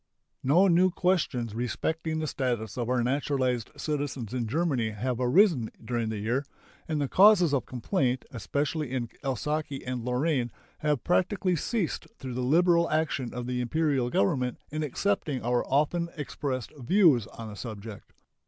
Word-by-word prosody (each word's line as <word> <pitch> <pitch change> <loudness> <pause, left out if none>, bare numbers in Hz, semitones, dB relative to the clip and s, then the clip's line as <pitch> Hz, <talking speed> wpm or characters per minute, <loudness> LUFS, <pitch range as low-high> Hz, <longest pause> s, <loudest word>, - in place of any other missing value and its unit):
No 170 +9 +4
new 180 +1 +5
questions 155 - 0
respecting 160 +7 -2
the 160 - -1
status 120 -7 -2
of 120 -1 -2
our 125 -1 +2
naturalized 130 -2 0
citizens 140 -6 -3
in 120 -3 -1
Germany 135 -4 0
have 120 +3 -3
arisen 130 - +4 0.2
during 120 -2 -1
the 110 - -3
year, 120 +7 0 0.4
and 155 -2 -1
the 140 - 0
causes 185 -2 +6
of 140 - 0
complaint, 130 - -1
especially 145 +5 -2
in 125 -3 -2
Alsace 145 +1 -2
and 125 -2 -3
Lorraine, 125 0 0 0.3
have 150 -5 0
practically 185 +1 +1
ceased 190 +2 -2
through 130 -2 -6
the 125 - -2
liberal 170 +5 +4
action 155 -5 0
of 125 0 -5
the 125 0 -2
Imperial 135 -1 +1
Government 125 +3 +1
in 155 +1 -2
accepting 150 -2 -1
our 120 +1 +1
often 160 +5 +1
expressed 135 -4 -4
views 145 - +4
on 115 -1 -9
the 105 - -8
subject. 105 0 -8
135 Hz, 155 wpm, -28 LUFS, 120-160 Hz, 0.4 s, causes